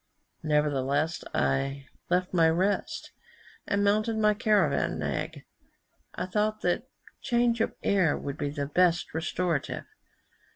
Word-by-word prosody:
Nevertheless 150 +1 0
I 135 0 0 0.2
left 180 +1 +1
my 165 -2 +5
rest, 185 +5 -1 0.6
and 200 0 +1
mounted 215 +2 +2
my 210 -1 +4
caravan 210 -2 +2
nag; - - -3 0.7
I - - -2
thought 215 +3 -1
that 180 +9 0 0.3
change 235 -1 +2
of - - -1
air 185 -7 +3
would 140 +1 -6
be 145 - -1
the 145 0 -3
best 170 +3 +2
restorative. 165 -1 -2
180 Hz, 120 wpm, -28 LUFS, 150-210 Hz, 0.7 s, my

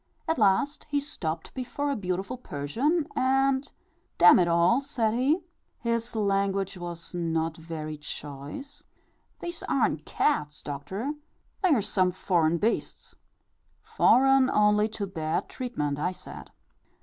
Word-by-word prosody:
At 320 - 0
last 215 +10 +2
he 290 -1 +1
stopped 175 - -5
before 280 +3 -3
a - - 0
beautiful 190 +2 -3
Persian, 250 - -1
and, 270 +1 +2 0.5
"D - - +4
n 175 - +9
it 175 - +3
all," 170 +9 +4
said 225 -5 -1
he 280 +9 +2 0.3
his 230 -1 -2
language 195 -2 0
was 175 -1 -7
not 165 -2 -1
very 160 -2 -6
choice 150 - -7 0.6
"these 345 0 -3
aren't - - +1
cats, 150 - 0
Doctor 170 - -4 0.5
they 375 - +3
are 220 - +1
some 185 -2 +2
foreign 170 -3 +1
beasts." 220 +7 -2 0.7
"Foreign 270 0 +4
only 210 -1 +4
to 210 -2 -4
bad 160 -5 -2
treatment," 150 - -3
I 180 +4 0
said. - - -10
200 Hz, 130 wpm, -27 LUFS, 165-265 Hz, 0.7 s, n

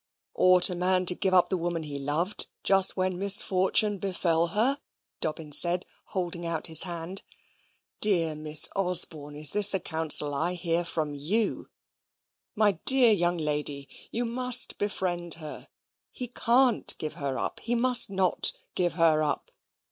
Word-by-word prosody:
"Ought 185 -1 +5
a - - -3
man 185 +1 0
to 180 - +6
give 190 +1 -2
up 180 - +3
the 190 - -2
woman 170 -1 -4
he 145 -2 -6
loved, 155 +8 -1 0.2
just 195 0 +3
when 185 -1 -2
misfortune 200 +1 +3
befell 170 -3 -1
her?" 235 +11 0 0.4
Dobbin 155 -1 -5
said, 175 +4 +1 0.2
holding 175 -2 -5
out 165 -2 -4
his 160 -2 +3
hand. 175 +1 -5 0.8
"Dear 170 -7 +2
Miss 150 0 +3
Osborne, 165 -6 0
is 150 0 +2
this 205 -1 +2
the 190 - -1
counsel 160 -3 +2
I 170 +6 -2
hear 170 -1 -1
from 155 -3 -4
you? 185 +11 -3 0.9
My 205 -5 0
dear 260 -3 +6
young 175 -3 0
lady! 150 -3 -2 0.2
you 240 +2 -3
must 250 +1 +1
befriend 175 -4 -3
her. 155 -2 -10 0.4
He 250 -2 -7
can't 245 0 +1
give 155 - -6
her 140 -2 -5
up. - - -5
He 240 +1 -3
must 250 -1 +3
not 190 -2 +1 0.2
give 175 -2 -1
her 165 -2 +2
up. 150 - -3
175 Hz, 155 wpm, -26 LUFS, 160-200 Hz, 0.9 s, to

